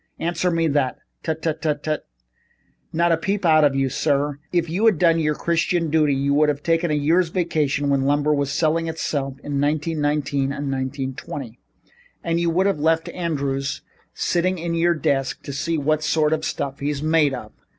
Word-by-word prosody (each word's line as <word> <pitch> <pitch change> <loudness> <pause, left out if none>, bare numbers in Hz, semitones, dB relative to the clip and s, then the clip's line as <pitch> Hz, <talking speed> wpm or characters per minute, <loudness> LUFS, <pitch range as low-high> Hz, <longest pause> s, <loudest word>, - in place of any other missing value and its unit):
Answer 170 +1 0
me 165 -1 +1
that. 140 -3 0 0.2
Tut, 160 -1 -3
tut, 160 -2 -1
tut! 155 -1 -2 0.8
Not 170 +1 +2
a 165 - +3
peep 195 +3 -2
out 155 -2 +5
of 140 -2 +3
you, 135 0 +2
sir. 145 +1 0
If 175 -1 +1
you 175 +7 -2
had 215 -7 +4
done 165 0 +4
your 150 -1 +1
Christian 170 0 0
duty, 150 -3 +3
you 140 +1 +1
would 150 +1 +4
have 145 0 -2
taken 165 +1 +1
a 150 - +1
year's 165 +4 +2
vacation 155 -5 0
when 140 -1 +2
lumber 145 +2 +2
was 140 -1 0
selling 165 +1 +1
itself 140 -4 -3
in 140 -1 -2
1919 150 -1 0
and 140 0 -3
1920, 130 -2 -5 0.6
and 170 0 0
you 170 0 +1
would 180 +3 +2
have 195 -6 +1
left 160 +2 +1
Andrews 140 -6 -2 0.3
sitting 185 +2 0
in 170 0 -3
at 170 - -1
your 170 +1 +3
desk 135 -3 -1
to 140 - -6
see 165 +4 -1
the 155 +1 +2
sort 155 0 +1
of 155 0 -1
stuff 140 -2 -3
he's 145 0 -2
made 155 -3 +3
of." 110 -3 -9
155 Hz, 190 wpm, -22 LUFS, 140-165 Hz, 0.8 s, out